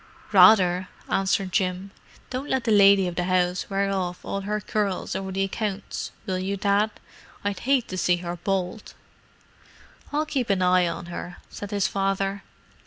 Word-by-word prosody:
"Rather," 185 -2 +6 0.2
answered 195 0 +1
Jim. 185 0 -1 0.4
"Don't 260 +3 -4
let 260 -2 0
the 230 - 0
lady 200 -2 +6
of 175 - -3
the 180 +1 -1
house 180 0 0
wear 195 0 0
off 180 -2 -3
all 195 - -3
her 210 +2 -2
curls 205 -3 -2
over 190 0 -3
the 195 +1 0
accounts, 200 0 -4
will 185 -1 -2
you, 195 +2 -2
Dad? 200 +2 +2 0.6
I'd 200 -2 -1
hate 270 -4 +3
to 185 - -3
see 180 0 +3
her 175 0 -5
bald!" 190 +3 -3 1.2
"I'll 300 +2 0
keep 270 -7 -2
an 190 -2 +2
eye 180 -1 +4
on 170 - -4
her," 175 +1 -6
said 205 - -7
his 200 -2 +1
father. 195 0 -1
195 Hz, 170 wpm, -25 LUFS, 185-205 Hz, 1.2 s, Rather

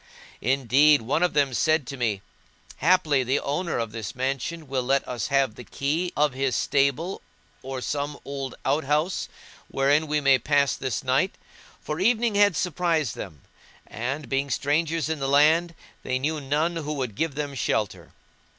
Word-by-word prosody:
Indeed 135 +2 +4
one 140 +8 0
of 180 -1 +2
them 140 -3 +2
said 155 +2 +2
to 140 - -6
me:—Haply 135 - -1
the 130 +2 +1
owner 160 +5 -2
of 115 -2 -2
this 110 -2 -6
mansion 135 +5 -3
will 130 -1 -1
let 135 +2 +1
us 125 -1 -3
have 135 -5 +2
the 125 - -10
key 155 +9 -2
of 150 -2 +3
his 130 -2 0
stable 140 +6 0 0.4
or 130 -1 -5
some 145 +2 -3
old 135 -2 -5
out 140 +2 +1
house 150 +6 0 0.4
wherein 145 +3 +2
we 150 0 +1
may 135 -2 +4
pass 140 +1 +2
this 130 +2 -3
night; 130 +9 +1 0.4
for 150 +1 -5
evening 230 +3 +2
had 205 -2 +4
surprised 165 - 0
them 80 -9 -8 0.4
and, 135 +6 -4
being 135 +1 -1
strangers 150 +3 0
in 160 -1 -2
the 135 0 -1
land, 160 +4 +4 0.3
they 130 - -1
knew 150 +3 -2
none 150 +5 0
who 150 -2 -3
would 130 -6 -3
give 155 +6 -2
them 145 -1 -3
shelter. 110 -5 -2
140 Hz, 165 wpm, -25 LUFS, 130-155 Hz, 0.4 s, Indeed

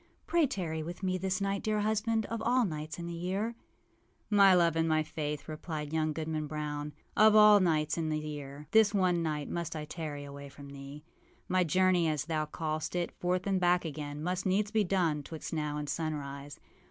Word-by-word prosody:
Pray 335 -3 +3
tarry 170 -10 -3
with 175 +5 -7
me 185 -1 +1
this 190 +1 -1
night, 195 0 -1
dear 215 -1 0
husband, 220 +1 +1
of 230 -1 -4
all 245 +1 +3
nights 155 -3 -5
in 170 - -5
the 170 - -5
year.â 200 +4 -6
âMy 195 -2 +7
love 170 -2 +3
and 165 0 +1
my 155 0 +3
Faith,â 150 -1 -4
replied 155 -1 -5
young 155 -1 +1
Goodman 155 0 -3
Brown, 150 -1 -4 0.2
âof 215 0 +6
all 210 -1 +8
nights 155 -3 +1
in 160 -1 -1
the 155 - 0
year, 145 -1 -6
this 220 -2 +5
one 180 -3 +2
night 150 -3 -2
must 170 -1 -3
I 155 -1 -4
tarry 150 -3 -5
away 140 0 -9
from 140 0 -12
thee. 140 +1 -9 0.4
My 185 0 +3
journey, 180 +1 +3
as 150 -2 -1
thou 155 -2 -1
callest 155 +1 -3
it, 175 -1 -1
forth 180 +1 -1
and 195 -2 +1
back 175 0 +3
again, 150 -1 -5
must 180 +2 -1
needs 205 +2 +1
be 220 -1 +3
done 175 -6 +1
âtwixt 160 +3 -7
now 150 -2 -2
and 150 0 -4
sunrise. 145 -2 -4
165 Hz, 200 wpm, -31 LUFS, 150-190 Hz, 0.4 s, all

